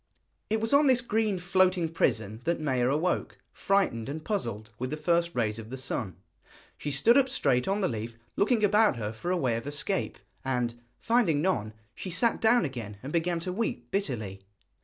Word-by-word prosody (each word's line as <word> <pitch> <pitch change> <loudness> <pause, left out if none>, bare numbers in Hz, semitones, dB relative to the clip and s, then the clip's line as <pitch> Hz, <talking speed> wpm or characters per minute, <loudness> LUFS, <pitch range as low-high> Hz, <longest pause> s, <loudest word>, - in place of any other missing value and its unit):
It 220 +1 +1
was 225 +4 0
on 285 +1 +6
this 255 -2 +5
green 220 -4 0
floating 180 -1 +2
prison 110 -9 0
that 170 0 +1
Maia 130 -5 +1
awoke, 160 +6 0 0.2
frightened 185 - +1
and 155 +2 -6
puzzled, 115 - -3
with 130 +1 -2
the 150 - -3
first 170 +2 +1
rays 110 -2 0
of 110 0 -9
the 130 - -5
sun. 115 -8 -3 0.6
She 145 - -5
stood 180 - +4
up 265 -1 +2
straight 135 - +1
on 200 +2 +1
the 185 - +2
leaf, 115 0 -5 0.2
looking 220 +1 +2
about 210 -1 +4
her 110 -2 -4
for 145 +11 -5
a 185 - +2
way 125 -8 +1
of 115 - -6
escape, 150 +7 -2 0.3
and, 125 -3 0 0.2
finding 225 -11 +2
none, 120 - 0 0.2
she 190 - -6
sat 230 +7 +1
down 225 -3 +4
again 115 -7 -6
and 140 - -6
began 170 0 +1
to 180 +1 -3
weep 180 - -3
bitterly. 110 - -2
160 Hz, 190 wpm, -28 LUFS, 120-195 Hz, 0.6 s, on